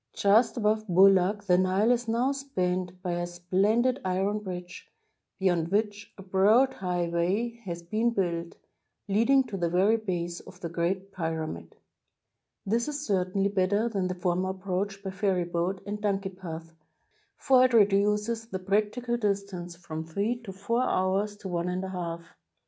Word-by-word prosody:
Just 220 Hz, +5 st, +3 dB
above 215 Hz, -1 st, +1 dB
Boulak 195 Hz, +2 st, +4 dB
the 180 Hz, -3 st, +3 dB
Nile 190 Hz, +5 st, +3 dB
is 245 Hz, -1 st, 0 dB
now 235 Hz, +4 st, +1 dB
spanned 185 Hz, -10 st, -2 dB
by 180 Hz, -, -1 dB
a 175 Hz, 0 st, -2 dB
splendid 200 Hz, +9 st, +1 dB
iron 190 Hz, +3 st, 0 dB
bridge, 180 Hz, -3 st, -8 dB, 0.5 s
beyond 175 Hz, -4 st, +1 dB
which 205 Hz, +1 st, -1 dB
a 195 Hz, -, -10 dB
broad 210 Hz, +8 st, +4 dB
highway 180 Hz, +6 st, -1 dB
has 170 Hz, -2 st, -5 dB
been 220 Hz, +7 st, +1 dB
built, 170 Hz, -6 st, -2 dB, 0.5 s
leading 230 Hz, +7 st, +4 dB
to 225 Hz, -6 st, -6 dB
the 170 Hz, -2 st, 0 dB
very 195 Hz, +6 st, +3 dB
base 175 Hz, -5 st, -3 dB
of 180 Hz, -, -14 dB
the 170 Hz, -, -5 dB
Great 185 Hz, +4 st, -2 dB
Pyra 160 Hz, -3 st, -3 dB
mid. 85 Hz, -, -9 dB, 0.9 s
This 230 Hz, +6 st, 0 dB
is 295 Hz, 0 st, -4 dB
certainly 195 Hz, 0 st, +1 dB
better 200 Hz, +3 st, +1 dB
than 195 Hz, -5 st, -1 dB
the 185 Hz, -, -3 dB
former 180 Hz, +1 st, 0 dB
approach 195 Hz, +1 st, -3 dB
by 190 Hz, -, -4 dB
ferryboat 185 Hz, -1 st, -1 dB
and 205 Hz, +1 st, -5 dB
donkey 195 Hz, -2 st, 0 dB
path, 165 Hz, -3 st, -8 dB, 0.6 s
for 255 Hz, -1 st, +5 dB
it 255 Hz, -, +1 dB
reduces 210 Hz, +2 st, +3 dB
the 195 Hz, -, -4 dB
practi 210 Hz, +5 st, -1 dB
cal 240 Hz, 0 st, 0 dB
distance 200 Hz, -5 st, -2 dB
from 160 Hz, -2 st, -6 dB
three 205 Hz, +9 st, -2 dB
or 190 Hz, -, -5 dB
four 230 Hz, +5 st, 0 dB
hours 200 Hz, -1 st, 0 dB
to 205 Hz, -, -8 dB
one 175 Hz, -1 st, -2 dB
and 180 Hz, +1 st, -2 dB
a 190 Hz, -, -4 dB
half. 170 Hz, -2 st, -4 dB
195 Hz, 160 wpm, -28 LUFS, 180-210 Hz, 0.9 s, for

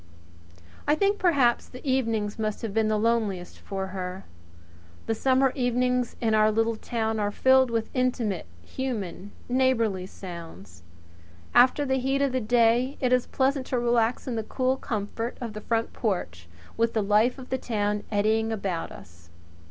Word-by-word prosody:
I 295 Hz, -, +4 dB
think 400 Hz, +4 st, +1 dB
perhaps 280 Hz, -10 st, +3 dB
the 255 Hz, +3 st, -10 dB
evenings 225 Hz, -5 st, 0 dB
must 215 Hz, +1 st, -2 dB
have 220 Hz, -3 st, -3 dB
been 220 Hz, 0 st, +2 dB
the 215 Hz, 0 st, +1 dB
loneliest 210 Hz, -5 st, -1 dB
for 190 Hz, -1 st, -5 dB
her. 185 Hz, 0 st, -5 dB, 0.8 s
The 225 Hz, -, 0 dB
summer 260 Hz, +3 st, +3 dB
evenings 250 Hz, -1 st, 0 dB
in 225 Hz, -2 st, +1 dB
our 215 Hz, 0 st, +4 dB
little 225 Hz, +1 st, +1 dB
town 220 Hz, 0 st, -2 dB
are 205 Hz, -1 st, +1 dB
filled 260 Hz, +4 st, +4 dB
with 230 Hz, -1 st, -2 dB
intimate, 240 Hz, -, -1 dB, 0.2 s
human, 210 Hz, -7 st, -4 dB, 0.2 s
neighbourly 230 Hz, -7 st, +1 dB
sounds. 165 Hz, -, -10 dB, 0.7 s
After 260 Hz, +4 st, +5 dB
the 265 Hz, -1 st, +1 dB
heat 270 Hz, +2 st, +1 dB
of 275 Hz, -, +1 dB
the 255 Hz, 0 st, -1 dB
day 240 Hz, +3 st, +3 dB
it 255 Hz, -1 st, +2 dB
is 250 Hz, -1 st, +3 dB
infinitely -, -, -22 dB
pleasant 270 Hz, 0 st, +2 dB
to 255 Hz, -, -1 dB
relax 240 Hz, +1 st, +1 dB
in 245 Hz, -, -2 dB
the 220 Hz, -, -2 dB
cool 255 Hz, +3 st, 0 dB
comfort 225 Hz, -1 st, -4 dB
of 230 Hz, -3 st, -5 dB
the 215 Hz, -, -7 dB
front 230 Hz, +1 st, -1 dB
porch, 85 Hz, -, -3 dB, 0.3 s
with 230 Hz, 0 st, +1 dB
the 220 Hz, -, +2 dB
life 215 Hz, +5 st, +3 dB
of 260 Hz, -1 st, -11 dB
the 260 Hz, -, 0 dB
town 210 Hz, -3 st, -1 dB
eddying 220 Hz, +2 st, +1 dB
about 195 Hz, -6 st, -3 dB
us. 85 Hz, -2 st, -14 dB
225 Hz, 170 wpm, -26 LUFS, 205-255 Hz, 0.8 s, After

